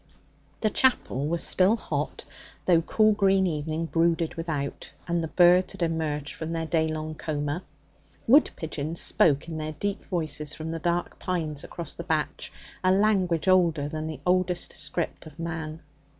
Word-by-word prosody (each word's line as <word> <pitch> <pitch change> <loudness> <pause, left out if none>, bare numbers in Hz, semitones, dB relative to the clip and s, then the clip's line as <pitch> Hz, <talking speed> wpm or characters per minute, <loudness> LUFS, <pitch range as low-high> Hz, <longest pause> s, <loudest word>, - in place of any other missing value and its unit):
The 215 - +2
chapel 150 - +2
was 170 +1 0
still 190 +4 +4
hot, - - -4 0.4
though 170 -3 +5
cool 215 +5 +3
green 195 -2 +3
evening 160 -1 -2
brooded 165 0 +1
without 155 -5 -4 0.2
and 170 -1 0
the - - -2
birds 180 +2 +5
had - - -3
emerged 155 -3 -2
from 160 +1 -5
their 165 -1 -2
day 160 0 +1
long 155 0 -4
coma. 150 +1 -3 0.6
Wood 280 +6 +6
pigeons 160 0 -3
spoke 145 -1 +3
in 160 -1 -5
their 155 0 -4
deep 200 +6 -3
voices 155 -4 -2
from 160 +1 -5
the 165 - -3
dark 175 +1 -1
pines 160 -6 -2
across 170 -4 -6
the 170 - -7
batch 160 -3 -2 0.3
a 185 - +4
language 190 -4 +2
older 170 -6 +3
than 155 +1 -4
the 155 - -6
oldest 180 -1 +1
script 155 +2 -4
of 155 -1 -14
man. 160 -1 -5
165 Hz, 165 wpm, -27 LUFS, 155-180 Hz, 0.6 s, Wood